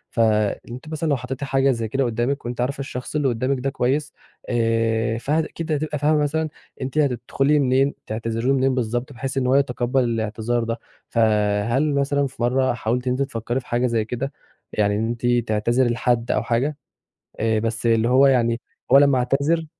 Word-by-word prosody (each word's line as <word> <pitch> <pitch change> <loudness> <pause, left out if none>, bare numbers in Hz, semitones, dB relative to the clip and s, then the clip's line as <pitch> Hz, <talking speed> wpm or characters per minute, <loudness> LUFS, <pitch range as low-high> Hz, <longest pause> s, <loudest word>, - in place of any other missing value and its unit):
ف - - -2
أنتِ 110 +4 0
مثلًا 155 0 -2
لو 140 - +2
حطيتي 130 +3 -5
حاجة 135 0 +2
زي 115 -3 -2
كده 135 +5 0
قُدامِك، 120 +3 -1
وأنتِ 120 0 -3
عارفة 135 +3 -2
الشخص 130 0 -6
اللي 145 -2 +2
قُدامِك 130 +2 0
ده 135 +2 -1
كويس، 135 +2 -1 0.4
آآ 115 -1 +1
فأكيد 155 +5 -2
هتبقى 150 -1 -1
فاهمة 150 +1 +3
مثلًا 155 +2 -1 0.3
أنتِ 130 +3 -4
هتدخلي 135 +1 +2
منين 135 +1 +2
تعتذري 115 +2 -3
له 135 - +4
منين 135 -1 +2
بالضبط، 120 +2 -2
بحيث 135 +2 -4
إن 125 - +1
هو 130 - +3
يتقبل 130 -1 +1
الاعتذار 115 0 -1
ده، 115 +1 -3 0.3
فهل 110 +5 +2
مثلًا 140 0 +1
في 130 - -12
مَرّة 130 +1 +2
حاولتِ 120 +2 -2
إن 125 - +2
أنتِ 130 - -2
تفكري 120 -1 -2
في 130 - -15
حاجة 120 +1 +1
زي 115 -2 0
كده، 130 +5 -4 0.4
يعني 105 -1 +1
إن 110 +2 0
أنتِ 120 +1 -4 0.2
تعتذري 120 +4 +2
لحد 120 0 0
أو 105 - +1
حاجة، 125 +6 0 0.6
آآ 110 0 +1
بس 115 +1 -3
اللي 115 0 +3
هو 135 +2 +6
يعني 120 -3 +2 0.3
هو 135 - +9
لمّا 140 -1 +5
يعتذر 140 +6 +1
125 Hz, 185 wpm, -22 LUFS, 115-140 Hz, 0.6 s, هو